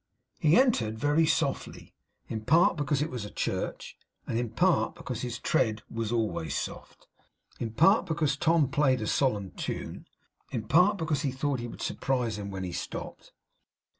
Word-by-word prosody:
He 155 +4 +5
entered 120 - +2
very 145 +6 +3
softly; 140 -4 -1 0.3
in 110 - -4
part 170 +6 +5
because 145 -1 0
it 160 - -4
was 125 -4 -4
a 105 - -6
church; - - -4 0.3
in 115 0 -1
part 170 +8 +2
because 130 -9 -5
his 125 -1 -3
tread 110 -1 0
was 115 -1 -3
always 105 - -1
soft; - - -7 0.5
in 115 - -2
part 190 - +4
because 155 -4 +1
Tom 160 -1 +3
played 130 -4 +2
a - - -2
solemn 105 -6 0
tune; - - -5 0.4
in 110 -3 -4
part 180 - +5
because 155 -5 -1
he 140 - 0
thought 135 0 -1
he 120 - -4
would - - -8
surprise 120 -5 -1
him 100 -1 -5
when 95 -1 -5
he 90 - -4
stopped. - - -6
130 Hz, 165 wpm, -29 LUFS, 110-155 Hz, 0.5 s, He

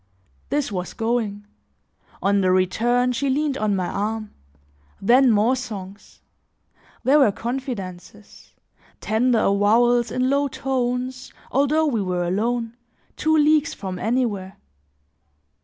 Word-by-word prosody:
This 285 -5 -1
was 180 -2 -4
going; 225 -3 -2 0.8
on 200 0 +3
the 185 - +2
return, 240 +7 +2
she 270 +3 -1
leaned 285 +1 0
on 215 -5 0
my 185 -2 -1
arm; 215 +3 -3 0.7
then 250 +6 +4
more 225 +3 +3
songs; 200 -6 -9 0.8
there 285 +3 +4
were 265 -8 +5
confidences, 210 -5 -7 0.4
tender 235 +3 +1
avowals 225 +4 +3
in 255 +3 0
low 280 +1 +2
tones, 255 -1 -3 0.2
although 285 +4 +2
we 240 -8 0
were 180 -2 -1
alone, 230 +6 -1 0.4
two 315 0 +2
leagues 305 +1 +3
from 185 -2 -6
anywhere. 215 -5 -1
235 Hz, 115 wpm, -22 LUFS, 200-260 Hz, 0.8 s, were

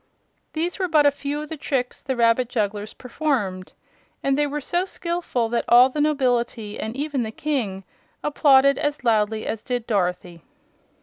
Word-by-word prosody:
These 340 +4 -2
were 370 - +1
but 310 -3 +4
a 285 - +6
few 285 +1 -4
of 305 - -10
the 320 - -5
tricks 260 -3 -2
the 265 -1 -3
rabbit 235 +1 +3
jugglers 210 -2 -2
performed, 235 -9 -2 0.5
and 275 0 +2
they 295 +1 +1
were 295 +1 -3
so 350 +5 -1
skillful 340 -10 -2
that 235 0 -1
all 245 +2 +7
the 295 +3 -2
nobility 245 -7 0
and 220 +2 -4
even 285 -1 -2
the 220 - -2
King 220 -7 -3 0.4
applauded 275 -2 +4
as 295 -3 -2
loudly 220 -2 +1
as 220 - -3
did 245 -1 -3
Dorothy. 180 -5 -2
255 Hz, 170 wpm, -23 LUFS, 220-295 Hz, 0.5 s, all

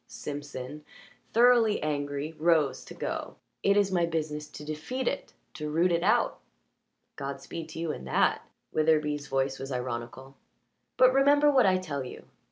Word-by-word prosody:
Simpson, 145 0 -7 0.5
thoroughly 235 -2 +5
angry, 145 0 -2
rose 160 -4 +2
to - - -10
go. - - -4 0.3
"It 200 +1 +3
is 200 -1 +3
my 175 -2 +2
business 150 -2 -3
to 150 - -10
defeat 160 - -4
it 280 - -2 0.2
to 150 -1 -5
root 170 +4 +2
it 170 0 +2
out." - - +2 0.8
"Godspeed 140 +4 -6
to 160 - -8
you 165 -2 -1
in 65 - -7
that" 65 - +2 0.3
Witherbee's 150 -2 +1
voice 135 0 -1
was 135 +1 -6
ironical. 125 +2 -5 0.6
"But 255 0 +6
remember 290 +2 +5
what 260 -6 +5
I 185 -1 +4
tell 150 -7 -4
you. 125 - -9
155 Hz, 155 wpm, -28 LUFS, 140-185 Hz, 0.8 s, But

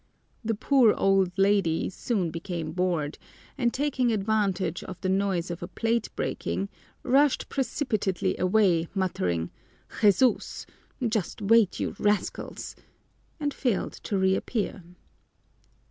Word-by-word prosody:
The 225 0 0
poor 245 0 +4
old 195 -2 +3
lady 195 -4 +2
soon 190 -4 -1
became 165 -1 -4
bored, 170 -4 -1 0.4
and 240 -4 +1
taking 260 -3 0
advantage 200 -4 0
of 185 - -8
the 185 - -1
noise 190 -2 0
of 170 - -6
a 175 - -4
plate 230 +4 -1
breaking, 195 - -2 0.3
rushed 275 +2 +3
precipitately 230 - -1
away, 180 -3 +3
muttering, 90 - -1 0.5
"Jesús! 215 +4 +3 0.4
Just 215 -3 -2
wait, 215 -1 +4
you - - -2
rascals!" 210 0 -1 0.6
and 290 -2 -1
failed 240 -7 -1
to 200 - -2
reappear. 190 +1 0
195 Hz, 115 wpm, -27 LUFS, 180-230 Hz, 0.6 s, poor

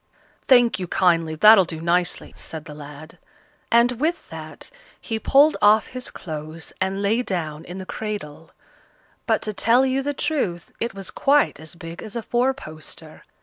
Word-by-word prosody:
"Thank 245 -5 +5
you 180 - -4
kindly, 165 -3 +2
that'll 210 +4 +8
do 165 -2 -6
nicely," 175 +2 0
said 160 -2 -8
the 150 - -9
lad; 150 +1 -11 0.5
and 235 +1 +5
with 330 +5 -1
that - - -8 0.3
he 225 -1 -4
pulled 285 +6 +4
off 210 +1 +5
his 255 0 -6
clothes 155 -1 -7
and 190 +1 -1
lay 220 +4 +2
down 160 -8 -4
in 175 +2 -8
the 190 - -7
cradle; 185 -8 -6 0.8
but, - - +1
to 215 - -3
tell 240 +5 +3
you 265 +1 0
the 290 +1 -3
truth, 270 - -2
it 235 -3 -3
was 195 -1 -6
quite 285 - +2
as 160 +2 -9
big 165 0 -9
as 215 -1 -8
a 235 - -3
four 245 +4 +1
poster. 155 - -10
195 Hz, 170 wpm, -23 LUFS, 165-240 Hz, 0.8 s, that'll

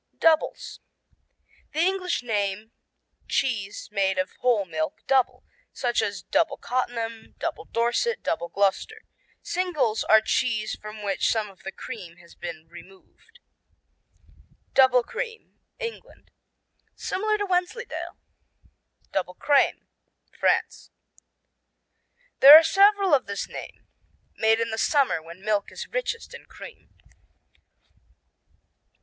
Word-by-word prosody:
Doubles 320 -1 +1 0.9
The 305 - -2
English 365 -4 0
name 210 -1 -2 0.6
cheese 205 -7 -2
made 195 -2 +1
of 185 +1 -1
whole 235 -6 +2
milk 155 -2 -4
"double," 265 -2 +1 0.3
such 240 -1 0
as 200 -3 -3
Double 315 -4 +1
Cottenham, 230 -3 -4
Double - - -4
Dorset, 240 - 0
Double 170 -6 -2
Gloucester. 200 - -1 0.4
"Singles" 310 -12 0
are 220 - +6
cheeses 220 -1 -1
from 215 0 -9
which 200 -1 0
some 215 -3 -1
of 190 - -22
the 195 - -6
cream 190 -7 -9
has 170 -1 -17
been 165 -2 -8
removed. 190 - -17 1.3
Double 260 -2 +5
cream 455 - -7 0.2
England 470 -2 -8 0.6
Similar 430 +2 -1
to 410 - -2
Wensleydale. 370 +5 -3 0.9
Double 180 -1 -2
crème 285 +6 +2 0.5
France - - 0 1.5
There 285 +3 +12
are 325 - +6
several 395 +2 +4
of 270 - +3
this 200 0 -4
name, - - -10 0.5
made 220 0 +3
in 230 0 -1
the 220 - -3
summer 275 - +2
when 170 +5 -13
milk 210 -2 0
is - - -7
richest - - -4
in - - -11
cream. - - -13
230 Hz, 115 wpm, -25 LUFS, 200-330 Hz, 1.5 s, There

